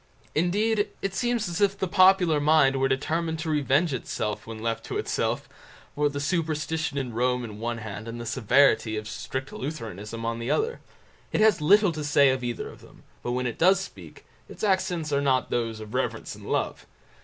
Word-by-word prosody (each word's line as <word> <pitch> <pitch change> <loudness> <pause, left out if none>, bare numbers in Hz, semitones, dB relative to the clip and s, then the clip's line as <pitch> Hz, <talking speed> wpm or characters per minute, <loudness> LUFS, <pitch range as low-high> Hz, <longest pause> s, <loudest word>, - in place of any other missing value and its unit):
Indeed, 205 +6 +1 0.2
it 195 -1 -1
seems 240 -1 0
as 175 +2 -3
if 200 -1 +3
the 190 - -1
popular 185 -4 +5
mind 145 -2 +4
were 135 0 +2
determined 160 +5 -1
to 160 0 -3
revenge 145 +2 +2
itself 110 -4 -3
when 115 -1 -6
left 115 0 -2
to - - -3
itself, - - -1 0.5
for 145 0 +1
the 145 0 -4
superstition 160 -1 -1
of 130 -4 -3
Rome 125 +1 +1
on 115 - -5
the - - -9
one 115 +3 -3
hand, 110 -1 -7
and 115 +1 -6
the 120 - -6
severity 120 -1 +3
of 105 0 -5
strict 130 +5 -5
Lutheranism 115 - -6
on 115 0 -2
the 115 - -4
other. 455 +2 0 0.5
It - - 0
has 215 -7 +4
little 200 +4 +5
to 155 -2 -5
say 145 -1 +5
of 130 -1 -2
either 120 -1 -3
of - - -12
them, - - -17 0.2
but 120 - -2
when 125 0 -1
it 120 - -3
does 185 +2 +5
speak, 190 - -10 0.2
its - - -10
accents 180 -6 0
are 140 - +2
not 130 -2 +1
those 115 -2 -1
of 110 +1 -9
reverence 130 +1 -2
and - - -11
love. - - -2
140 Hz, 200 wpm, -26 LUFS, 120-170 Hz, 0.5 s, popular